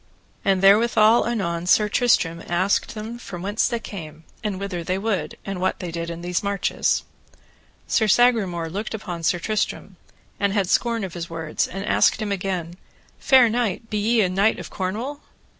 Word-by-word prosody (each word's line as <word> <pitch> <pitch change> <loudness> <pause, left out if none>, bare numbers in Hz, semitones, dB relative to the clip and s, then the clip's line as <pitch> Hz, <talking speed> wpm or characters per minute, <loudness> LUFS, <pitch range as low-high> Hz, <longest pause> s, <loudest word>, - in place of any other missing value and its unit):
And 195 -1 +2
therewithal 220 +3 +5
anon 175 -7 -2
Sir 210 +3 +4
Tristram 180 -7 +2
asked 185 +6 0
them 220 +2 -6
from 175 -6 -8
whence 205 +3 +1
they 235 -1 -2
came, 160 -7 -9 0.2
and 205 -3 -2
whither 190 -4 -4
they 185 +3 -1
would, 195 -7 -2
and 195 -2 -4
what 185 - 0
they 175 -2 -6
did 170 0 -4
in 170 0 -6
those 175 0 -1
marches. 200 -1 0 0.8
Sir 220 - +2
Sagramore 200 -7 +3
looked 205 +6 -4
upon 180 -5 -6
Sir 165 +2 +1
Tristram, 215 +4 -3 0.4
and 200 -1 +1
had 200 -3 +1
scorn 230 +2 +1
of 185 -3 -5
his 170 -1 -6
words, 165 -2 -2
and 195 +2 -6
asked - - +3
him 215 -2 -3
again, 180 -3 -3 0.4
Fair 260 -4 +6
knight, 225 -2 -2
be 210 - 0
ye 225 +2 +3
a 190 - +3
knight 195 +4 +2
of - - -8
Cornwall? 225 +10 -4
195 Hz, 175 wpm, -23 LUFS, 175-220 Hz, 0.8 s, Fair